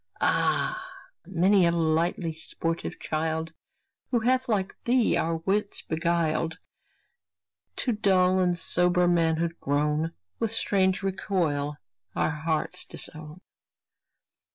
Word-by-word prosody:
Ah! 370 0 +1 0.4
many 190 +1 +4
a - - +3
lightly 165 0 0
sportive 165 +1 -4
child, 160 +1 -2 0.6
Who 240 - +2
hath 255 +2 +1
like 195 -3 0
thee 245 -1 +3
our 165 0 0
wits 200 +5 -1
beguiled, 160 0 0 1.2
To 250 - -1
dull 190 -3 +3
and 180 -1 +2
sober 180 +1 +3
manhood 170 -1 +1
grown, 150 +3 0 0.3
With 225 - 0
strange 190 -3 +1
recoil 165 -7 -1 0.4
our - - +1
hearts 160 +3 -2
disown. 155 +2 -8
170 Hz, 105 wpm, -27 LUFS, 160-190 Hz, 1.2 s, many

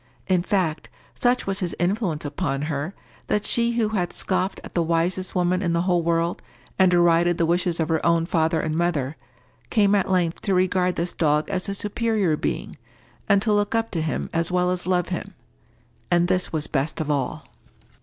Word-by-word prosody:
In 185 -2 +3
fact, 175 -4 -1 0.2
such 245 +1 +1
was 195 -1 -2
his 180 -3 -2
influence 175 -4 -1
upon 145 -2 -2
her, 155 +4 -3 0.3
that 210 0 0
she 235 0 +1
who 230 -2 +1
had 180 -5 -1
scoffed 185 0 -1
at - - -10
the 170 - +1
wisest 170 +3 0
woman 180 0 +1
in 175 -3 0
the 170 0 +1
whole 180 -2 +2
world, 170 +1 0 0.4
and 190 -1 +6
derided 175 -1 +3
the 170 - +2
wishes 175 0 0
of 160 - +1
her 160 -1 0
own 170 -1 +3
father 160 -1 +1
and 155 0 -2
mother, 160 -5 0 0.5
came 205 -3 +3
at 200 -2 +2
length 175 -3 +1
to 195 -3 0
regard 180 0 +2
this 170 +1 -2
dog 150 +2 +1
as 190 +1 -2
a 200 - -2
superior 210 -4 0
being, - - -3 0.5
and 200 0 +4
to 215 - +2
look 205 +1 +1
up 225 0 0
to 165 - -1
him 155 -1 -2
as 165 +1 0
well 180 0 +1
as 180 0 -3
love 180 -2 +1
him. 180 - -5 0.7
And 175 0 +3
this 185 0 0
was 155 -2 -1
best 145 +3 -2
of 155 -1 -1
all. 140 -3 -2
175 Hz, 195 wpm, -24 LUFS, 165-190 Hz, 0.7 s, and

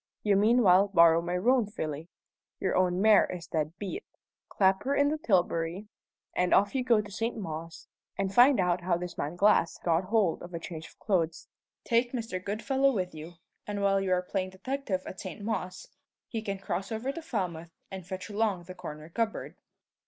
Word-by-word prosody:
You 205 -2 +3
meanwhile 205 -2 +5
borrow 170 -4 +5
my 175 +1 -2
roan 240 +3 +3
filly 160 -6 -5 0.5
your 190 - 0
own 180 -1 +2
mare 215 -2 +6
is 175 -2 -6
dead 155 +2 -3
beat 205 - -5 0.5
clap 190 -1 +2
her 275 +2 0
in 285 0 +3
the 310 +1 -2
tilbury, 180 - 0 0.5
and 180 0 +3
off 200 +1 +3
you 265 -2 0
go 230 -3 +4
to 205 -1 -11
St. 225 +4 -2
Mawes, 165 -4 -7 0.3
and 195 0 -1
find 250 +2 +6
out 180 -1 +1
how 175 -1 +1
this 180 0 -6
man 150 +4 -3
Glass 195 -3 +3
got 170 +1 0
hold 200 -4 +1
of 175 0 -8
a - - -3
change 160 -2 -7
of - - -20
clothes. 170 -5 -1 0.4
Take 240 +1 +1
Mr. 225 -7 -4
Goodfellow 265 +7 +1
with 185 -7 -2
you, 160 +2 -9 0.3
and 205 -1 -3
while 195 0 +3
you 190 -1 -1
are 180 0 +1
playing 185 0 -2
detective 195 0 -3
at 190 - -8
St. 185 - -7
Mawes, 185 -4 -4 0.4
he 225 - -4
can 200 -2 -3
cross 195 +1 -4
over 225 +5 -2
to 335 - -7
Falmouth 175 - -4 0.2
and 190 -1 -6
fetch 185 +2 -6
along 205 -4 -1
the 185 - -9
corner 155 -4 -8
cupboard. 220 +6 -3
190 Hz, 190 wpm, -29 LUFS, 175-220 Hz, 0.5 s, mare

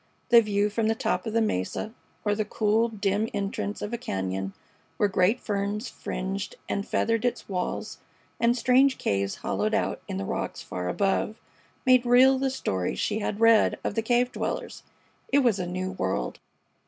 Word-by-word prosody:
The 235 -1 +8
view 205 -1 0
from 220 +1 0
the 225 - +2
top 225 - -1
of 220 - -3
the 230 0 +3
mesa, 210 - -2 0.3
or 205 - +3
the 215 +1 0
cool, 215 +2 +1
dim 210 0 0
entrance 200 +1 -3
of 210 +3 -4
a 235 - -2
cañon 95 0 -3 0.4
where 205 - +3
great 195 +5 +2
ferns 205 +2 -2
fringed 195 +2 -4
and 200 - -2
feathered 230 0 +1
its 245 - -1
walls, 180 -2 -3 0.4
and 235 +1 +3
strange 255 +2 +4
caves 100 0 -1
hollowed - - -1
out - - -1
in - - -4
the 95 - -3
rocks - - -3
far 90 0 -4
above, 200 - 0 0.5
made 255 -1 +6
real 255 +2 +6
the 270 0 +1
stories 95 - -2
she 215 +1 0
had 205 0 -3
read 230 -1 +5
of - - -1
the 225 - 0
cave 245 +2 +2
dwellers. - - -4 0.5
It 280 0 +4
was 225 -6 +3
a 180 - -2
new 185 +1 -3
world. 95 - -2
210 Hz, 180 wpm, -27 LUFS, 190-235 Hz, 0.5 s, The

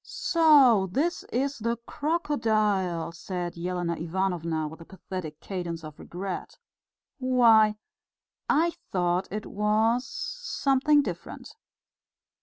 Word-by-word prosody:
"So 300 - +4
this 325 - 0
is 275 +3 -2
the 230 +2 -1
crocodile!" 215 - 0
said 175 +1 -5
Elena 175 0 -2
Ivanovna, 170 -2 -1
with 160 +2 -10
a - - -10
pathetic 180 -4 -7
cadence 175 -4 -5
of 155 -1 -10
regret. 185 +1 -6 0.6
"Why, 230 -5 +5 0.7
I 330 +3 +3 0.2
thought 180 0 +1
it 215 +2 -5
was... 220 +4 +1
something 295 - +1
different." - - -7
210 Hz, 100 wpm, -27 LUFS, 175-265 Hz, 0.7 s, Why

